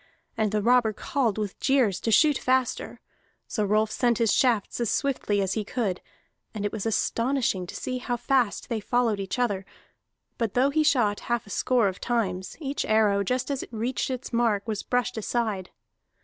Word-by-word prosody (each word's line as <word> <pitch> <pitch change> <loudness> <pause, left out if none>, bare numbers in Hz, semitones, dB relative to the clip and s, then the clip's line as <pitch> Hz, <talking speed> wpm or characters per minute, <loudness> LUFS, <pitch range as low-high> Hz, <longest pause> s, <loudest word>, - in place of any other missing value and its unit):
And 215 -2 0
the 210 -1 0
robber 240 -2 +4
called 235 -1 -1
with 210 -3 -4
jeers 250 -9 +2
to 225 - -1
shoot 300 +5 +5
faster. 260 -1 -1 0.5
So 215 - -1
Rolf 215 +1 +2
sent 240 -1 +1
his 230 -2 +2
shafts 235 -6 +1
as 235 -3 0
swiftly 250 -8 0
as 190 -1 0
he 215 - -1
could, 205 -4 -2 0.5
and 205 -1 -3
it 205 - -1
was 220 0 -3
astonishing 230 -4 0
to - - -8
see 255 0 -3
how 245 -1 -2
fast 240 -3 0
they 230 -2 -2
followed 230 -1 +1
each 195 +5 -3
other; 205 -6 0 0.8
but 230 -4 -1
though 265 +3 +3
he 310 +2 +2
shot 240 -9 +2
half 240 -2 0
a 200 - -12
score 245 -1 +2
of 190 0 -4
times, 190 -6 -2
each 280 -2 -2
arrow, 215 -2 +3
just 250 +7 -1
as 275 - -2
it - - -10
reached 235 +4 -2
its 255 -1 -5
mark, 230 -3 +1
was 215 -2 -2
brushed 245 -3 -1
aside. 215 -4 -2
230 Hz, 190 wpm, -26 LUFS, 205-250 Hz, 0.8 s, shoot